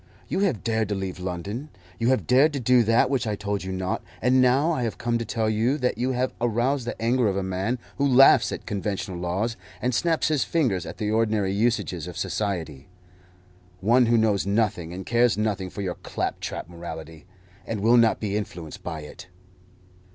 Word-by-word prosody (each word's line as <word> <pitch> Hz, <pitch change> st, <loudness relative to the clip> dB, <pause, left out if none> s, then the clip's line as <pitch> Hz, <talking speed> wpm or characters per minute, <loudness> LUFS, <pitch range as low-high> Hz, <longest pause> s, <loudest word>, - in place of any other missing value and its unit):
You -, -, -1 dB
have 185 Hz, -, 0 dB
dared 110 Hz, -2 st, 0 dB
to 105 Hz, -, 0 dB
leave 95 Hz, -1 st, -4 dB
London; 95 Hz, -, -5 dB, 0.3 s
you 115 Hz, -, +1 dB
have 130 Hz, 0 st, +2 dB
dared 140 Hz, +5 st, +4 dB
to 140 Hz, -, -2 dB
do 125 Hz, 0 st, +4 dB
that 115 Hz, +1 st, +3 dB
which 130 Hz, -5 st, 0 dB
I 105 Hz, -, -1 dB
told 100 Hz, -1 st, -3 dB
you 95 Hz, -, -4 dB
not; 95 Hz, 0 st, -2 dB, 0.2 s
and 130 Hz, +2 st, +3 dB
now 135 Hz, +6 st, +3 dB
I 155 Hz, -, -1 dB
have 115 Hz, -3 st, -2 dB
come 120 Hz, 0 st, -1 dB
to 115 Hz, -, -3 dB
tell 110 Hz, 0 st, -1 dB
you 115 Hz, +6 st, +1 dB
that 125 Hz, -3 st, -1 dB
you 130 Hz, +2 st, 0 dB
have 130 Hz, +1 st, -1 dB
aroused 120 Hz, +2 st, 0 dB
the -, -, -4 dB
anger 120 Hz, +1 st, +2 dB
of 100 Hz, -1 st, 0 dB
a 100 Hz, -, -1 dB
man 95 Hz, +6 st, -1 dB, 0.2 s
who 140 Hz, -, +3 dB
laughs 135 Hz, +1 st, +6 dB
at -, -, -6 dB
conventional 100 Hz, -2 st, -3 dB
laws, 95 Hz, +6 st, -1 dB, 0.2 s
and 125 Hz, +1 st, -1 dB
snaps 165 Hz, +5 st, +1 dB
his 150 Hz, -3 st, +2 dB
fingers 125 Hz, -, 0 dB
at -, -, -8 dB
the 105 Hz, -1 st, -1 dB
ordinary 110 Hz, -3 st, +1 dB
usages 100 Hz, -6 st, 0 dB
of 90 Hz, -, -8 dB
society 80 Hz, -9 st, -3 dB, 0.9 s
one 120 Hz, +5 st, +4 dB
who 115 Hz, 0 st, +4 dB
knows 110 Hz, -3 st, +2 dB
nothing 100 Hz, -4 st, 0 dB
and 95 Hz, +2 st, -7 dB
cares 120 Hz, -1 st, +3 dB
nothing 100 Hz, -3 st, -1 dB
for 100 Hz, -, -6 dB
your 90 Hz, -2 st, -2 dB
claptrap -, -, -4 dB
morality, 80 Hz, -2 st, -9 dB, 0.4 s
and 110 Hz, -3 st, -3 dB
will 115 Hz, +3 st, +5 dB
not 115 Hz, -2 st, +4 dB
be 105 Hz, -2 st, -2 dB
influenced 90 Hz, -7 st, -5 dB
by 80 Hz, -3 st, -5 dB
it." 75 Hz, +4 st, -11 dB
110 Hz, 200 wpm, -25 LUFS, 95-125 Hz, 0.9 s, laughs